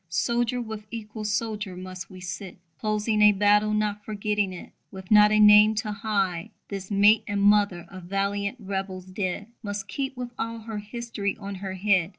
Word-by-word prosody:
Soldier 240 Hz, +7 st, 0 dB
with 220 Hz, -3 st, -6 dB
equal 215 Hz, -1 st, -7 dB
soldier 210 Hz, -2 st, -2 dB
must 185 Hz, 0 st, -8 dB
we 185 Hz, -, -11 dB
sit, 180 Hz, +1 st, -7 dB, 0.2 s
Closing 215 Hz, 0 st, 0 dB
a 210 Hz, 0 st, +7 dB
battle, 210 Hz, +1 st, +3 dB
not 210 Hz, -1 st, -1 dB
forgetting 210 Hz, -2 st, -1 dB
it. 180 Hz, -, -9 dB, 0.2 s
With 190 Hz, 0 st, -11 dB
not 210 Hz, 0 st, +7 dB
a 215 Hz, -, +4 dB
name 210 Hz, +1 st, +7 dB
to 215 Hz, 0 st, -2 dB
hide, 200 Hz, -5 st, -1 dB, 0.2 s
This 195 Hz, -2 st, -6 dB
mate 205 Hz, +2 st, +5 dB
and 205 Hz, 0 st, -1 dB
mother 200 Hz, -4 st, +3 dB
of 185 Hz, -2 st, -11 dB
valiant 200 Hz, +4 st, -1 dB
"rebels" 190 Hz, -2 st, -4 dB
dead 185 Hz, +1 st, -3 dB, 0.2 s
Must 205 Hz, -2 st, -5 dB
come 270 Hz, +7 st, -2 dB
with 245 Hz, -1 st, -6 dB
all 230 Hz, 0 st, -3 dB
her 220 Hz, -1 st, -5 dB
history 210 Hz, -2 st, -4 dB
on 200 Hz, -1 st, -6 dB
her 190 Hz, -1 st, -4 dB
head. 185 Hz, -3 st, +2 dB
205 Hz, 175 wpm, -26 LUFS, 195-215 Hz, 0.2 s, a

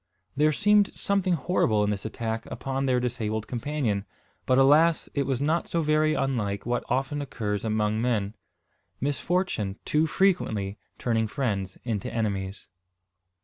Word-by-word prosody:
There 150 Hz, +2 st, +4 dB
seemed 205 Hz, +5 st, +4 dB
something 195 Hz, -3 st, +1 dB
horrible 125 Hz, -, +1 dB
in 105 Hz, -, +1 dB
this 100 Hz, 0 st, -4 dB
attack 110 Hz, 0 st, -3 dB
upon 135 Hz, 0 st, -3 dB
their 125 Hz, -1 st, +3 dB
disabled 110 Hz, -3 st, -2 dB
companion. 120 Hz, -5 st, -1 dB, 0.4 s
But 130 Hz, -, +4 dB
alas! 150 Hz, +5 st, +5 dB
it 140 Hz, -2 st, 0 dB
was 130 Hz, -3 st, 0 dB
not 155 Hz, +4 st, +1 dB
so 165 Hz, -1 st, 0 dB
very 155 Hz, 0 st, +3 dB
unlike 105 Hz, -7 st, -1 dB
what, 120 Hz, +1 st, 0 dB
often 135 Hz, +3 st, 0 dB
occurs 105 Hz, -7 st, -3 dB
among 110 Hz, 0 st, 0 dB
men, 110 Hz, -4 st, 0 dB, 0.7 s
misfortune 145 Hz, -, -1 dB
too 155 Hz, +2 st, +2 dB
frequently 110 Hz, -, +1 dB, 0.2 s
turning 115 Hz, -2 st, 0 dB
friends 100 Hz, -7 st, -2 dB
into 110 Hz, -5 st, -2 dB
enemies. 100 Hz, -4 st, -3 dB
125 Hz, 140 wpm, -27 LUFS, 105-150 Hz, 0.7 s, alas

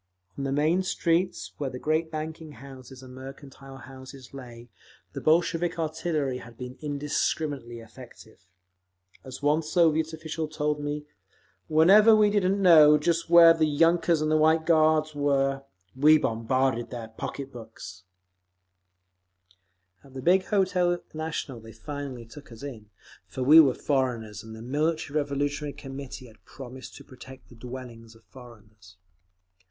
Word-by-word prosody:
On 140 Hz, -, -5 dB
the 135 Hz, -, -2 dB
main 155 Hz, +6 st, +1 dB
streets, 180 Hz, 0 st, -1 dB
where 140 Hz, -2 st, -2 dB
the 125 Hz, -, -7 dB
great 155 Hz, +4 st, -1 dB
banking 155 Hz, 0 st, -7 dB
houses 130 Hz, -1 st, -13 dB
and 130 Hz, -1 st, -12 dB
mercantile 135 Hz, +1 st, -11 dB
houses 130 Hz, +1 st, -13 dB
lay, 120 Hz, -3 st, -11 dB, 0.5 s
the -, -, -6 dB
Bolshevik 170 Hz, +2 st, +1 dB
artillery 155 Hz, -4 st, -2 dB
had 120 Hz, -1 st, -14 dB
been 125 Hz, 0 st, -8 dB
indiscriminately 145 Hz, -3 st, -3 dB
effective. 110 Hz, -4 st, -15 dB, 0.8 s
As 130 Hz, +1 st, -10 dB
one 150 Hz, +2 st, +2 dB
Soviet 160 Hz, -1 st, +1 dB
official 160 Hz, 0 st, -5 dB
told 150 Hz, -1 st, -2 dB
me, 145 Hz, 0 st, -4 dB, 0.6 s
"Whenever 195 Hz, +8 st, +6 dB
we 210 Hz, -1 st, +4 dB
didn't 200 Hz, -1 st, +1 dB
know 155 Hz, -5 st, +7 dB
just 165 Hz, +2 st, -1 dB
where 170 Hz, -1 st, +8 dB
the 160 Hz, -1 st, +1 dB
yunkers 165 Hz, +2 st, +2 dB
and 155 Hz, 0 st, +2 dB
White 160 Hz, +1 st, +3 dB
Guards 155 Hz, -1 st, +3 dB
were, 135 Hz, -1 st, 0 dB, 0.3 s
we 150 Hz, +4 st, +6 dB
bombarded 120 Hz, 0 st, -1 dB
their 115 Hz, -3 st, -7 dB
pocketbooks…." 110 Hz, -6 st, -9 dB, 2.0 s
At 135 Hz, -1 st, -18 dB
the 130 Hz, -, -6 dB
big 185 Hz, +4 st, +3 dB
Hotel 185 Hz, -3 st, +1 dB, 0.2 s
National 155 Hz, -5 st, -5 dB
they 115 Hz, 0 st, -13 dB
finally 135 Hz, 0 st, -7 dB
took 140 Hz, +4 st, -14 dB
us 115 Hz, +3 st, -12 dB
in; 115 Hz, -7 st, -9 dB, 0.4 s
for 130 Hz, -, -5 dB
we 150 Hz, +5 st, +8 dB
were 140 Hz, -5 st, +5 dB
foreigners, 120 Hz, -7 st, -2 dB
and 110 Hz, 0 st, -10 dB
the 110 Hz, -, -10 dB
Military 150 Hz, +3 st, -2 dB
Revolutionary 145 Hz, 0 st, -3 dB
Committee 135 Hz, -1 st, -9 dB
had 110 Hz, -3 st, -18 dB
promised 130 Hz, -1 st, -11 dB
to -, -, -12 dB
protect 130 Hz, 0 st, -14 dB
the 125 Hz, -, -15 dB
dwellings 120 Hz, -2 st, -10 dB
of 115 Hz, -, -21 dB
foreigners…. 110 Hz, -7 st, -17 dB
145 Hz, 140 wpm, -26 LUFS, 125-160 Hz, 2.0 s, where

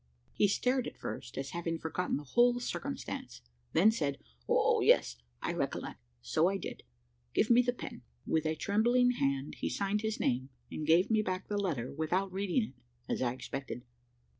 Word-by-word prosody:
He 205 Hz, -, +4 dB
stared 250 Hz, +5 st, +1 dB
at -, -, -8 dB
first, 120 Hz, -, -6 dB
as 135 Hz, 0 st, -3 dB
having 170 Hz, -1 st, -2 dB
forgotten 160 Hz, +3 st, -1 dB
the 145 Hz, -, -6 dB
whole 240 Hz, -, +4 dB
circumstance 70 Hz, -, -5 dB, 0.3 s
then 205 Hz, +7 st, +6 dB
said 145 Hz, -10 st, -1 dB, 0.3 s
"O -, -, +4 dB
yes! -, -, +4 dB, 0.3 s
I -, -, 0 dB
recollect, -, -, -3 dB, 0.2 s
so 160 Hz, -, +3 dB
I 195 Hz, -, -1 dB
did -, -, -6 dB, 0.5 s
give 225 Hz, -, +3 dB
me 240 Hz, +1 st, +8 dB
the 245 Hz, 0 st, +1 dB
pen." 245 Hz, -, -8 dB, 0.2 s
With 160 Hz, -1 st, +1 dB
a 155 Hz, -, 0 dB
trembling 240 Hz, +8 st, +3 dB
hand 140 Hz, -, -1 dB
he -, -, -1 dB
signed 200 Hz, +1 st, 0 dB
his 220 Hz, -1 st, -2 dB
name, 130 Hz, +2 st, 0 dB, 0.2 s
and 155 Hz, -, -4 dB
gave 175 Hz, +6 st, +5 dB
me 220 Hz, -1 st, +4 dB
back 185 Hz, -2 st, -3 dB
the 205 Hz, -, 0 dB
letter 140 Hz, -11 st, -2 dB
without 180 Hz, +6 st, 0 dB
reading 200 Hz, +5 st, +1 dB
it, 175 Hz, -, -7 dB, 0.3 s
as -, -, -1 dB
I 125 Hz, -2 st, +2 dB
expected. 130 Hz, -1 st, -6 dB
185 Hz, 180 wpm, -32 LUFS, 140-220 Hz, 0.5 s, me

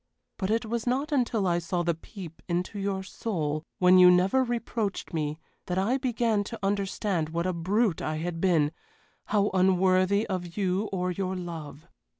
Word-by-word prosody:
But 190 Hz, -2 st, -1 dB
it 225 Hz, +2 st, +1 dB
was 235 Hz, +2 st, -3 dB
not 275 Hz, +5 st, 0 dB
until 240 Hz, -7 st, +1 dB
I 175 Hz, -1 st, +2 dB
saw 175 Hz, +1 st, -2 dB
the 170 Hz, 0 st, +1 dB
peep 165 Hz, 0 st, -10 dB
into 180 Hz, +4 st, -2 dB
your 195 Hz, -1 st, -2 dB
soul, 155 Hz, -7 st, -3 dB, 0.2 s
when 185 Hz, -1 st, +6 dB
you 180 Hz, 0 st, +9 dB
never 185 Hz, +9 st, +4 dB
reproached 230 Hz, -5 st, -3 dB
me, 155 Hz, -1 st, -2 dB, 0.3 s
that 180 Hz, -, -1 dB
I 225 Hz, +8 st, +1 dB
began 235 Hz, -5 st, +1 dB
to 230 Hz, +2 st, -7 dB
understand 195 Hz, -4 st, -1 dB
what 170 Hz, +2 st, -2 dB
a 185 Hz, -, 0 dB
brute 190 Hz, +3 st, +1 dB
I 155 Hz, -, -2 dB
had 165 Hz, +1 st, -4 dB
been 160 Hz, -6 st, +3 dB, 0.5 s
how 205 Hz, -1 st, +1 dB
unworthy 185 Hz, +2 st, +3 dB
of 180 Hz, -2 st, -4 dB
you 195 Hz, +1 st, 0 dB
or 180 Hz, -1 st, -1 dB
your 185 Hz, +1 st, -2 dB
love. 165 Hz, -3 st, -7 dB
185 Hz, 170 wpm, -28 LUFS, 175-210 Hz, 0.5 s, you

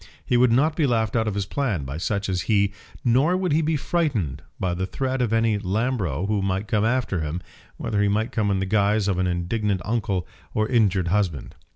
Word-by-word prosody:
He 125 Hz, -, +1 dB
would 120 Hz, 0 st, +5 dB
not 150 Hz, +6 st, +3 dB
be 155 Hz, -4 st, +2 dB
laughed 110 Hz, -3 st, 0 dB
out 110 Hz, -1 st, +1 dB
of 105 Hz, -, -1 dB
his 100 Hz, -1 st, -1 dB
plan 105 Hz, -, -1 dB
by 70 Hz, +3 st, -5 dB
such 100 Hz, +4 st, -1 dB
as 95 Hz, -2 st, -1 dB
he, 100 Hz, -2 st, +3 dB, 0.3 s
nor 135 Hz, +9 st, +3 dB
would 185 Hz, -3 st, -1 dB
he 155 Hz, +2 st, +3 dB
be 160 Hz, 0 st, +1 dB
frightened 120 Hz, -, -1 dB, 0.2 s
by 90 Hz, -2 st, 0 dB
the 95 Hz, +2 st, -2 dB
threat 130 Hz, +4 st, -2 dB
of 120 Hz, -3 st, 0 dB
any 115 Hz, -2 st, +2 dB
Lambro 100 Hz, -, -1 dB
who 105 Hz, 0 st, 0 dB
might 95 Hz, +2 st, -1 dB
come 105 Hz, -3 st, +1 dB
after 115 Hz, -5 st, 0 dB
him, 80 Hz, +3 st, -3 dB, 0.4 s
whether 105 Hz, -1 st, -1 dB
he 105 Hz, -, +3 dB
might 110 Hz, +3 st, 0 dB
come 105 Hz, -2 st, 0 dB
in 100 Hz, -, +1 dB
the 95 Hz, -, -1 dB
guise 105 Hz, +1 st, +2 dB
of 95 Hz, -3 st, 0 dB
indignant 95 Hz, +2 st, 0 dB
uncle 105 Hz, -6 st, -1 dB, 0.3 s
or 110 Hz, 0 st, +2 dB
injured 100 Hz, -7 st, +2 dB
husband. 90 Hz, -8 st, -1 dB
105 Hz, 215 wpm, -24 LUFS, 95-120 Hz, 0.4 s, would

